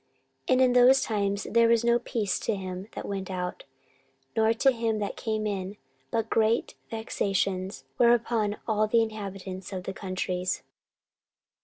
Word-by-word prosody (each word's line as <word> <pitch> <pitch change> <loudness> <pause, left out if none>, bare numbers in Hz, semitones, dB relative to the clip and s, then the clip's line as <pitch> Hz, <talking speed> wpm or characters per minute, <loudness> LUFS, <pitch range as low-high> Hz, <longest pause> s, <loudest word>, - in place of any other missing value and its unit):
14:015:005 - - +4
And 255 - +4
in 255 -1 +5
those 250 +2 +6
times 200 -2 -1
there 230 0 +5
was 230 0 +3
no 235 0 +4
peace 215 -5 -1
to 225 - -1
him 185 0 -6
that - - -6
went 195 -1 -4
out, 180 -1 -4 0.7
nor 220 0 +4
to 250 +4 +4
him 230 -2 -1
that 205 -1 -3
came 215 -1 -2
in, 200 -1 -3 0.3
but 225 +7 -1
great 225 0 +1 0.2
vexations 195 -7 -2 0.2
were 240 0 +7
upon 220 -3 -1
all 215 -1 +2
the 230 +1 +4
inhabitants 195 -3 -6
of 185 -2 -4
the 190 - -4
countries. 185 -1 -2
215 Hz, 160 wpm, -27 LUFS, 190-230 Hz, 0.7 s, were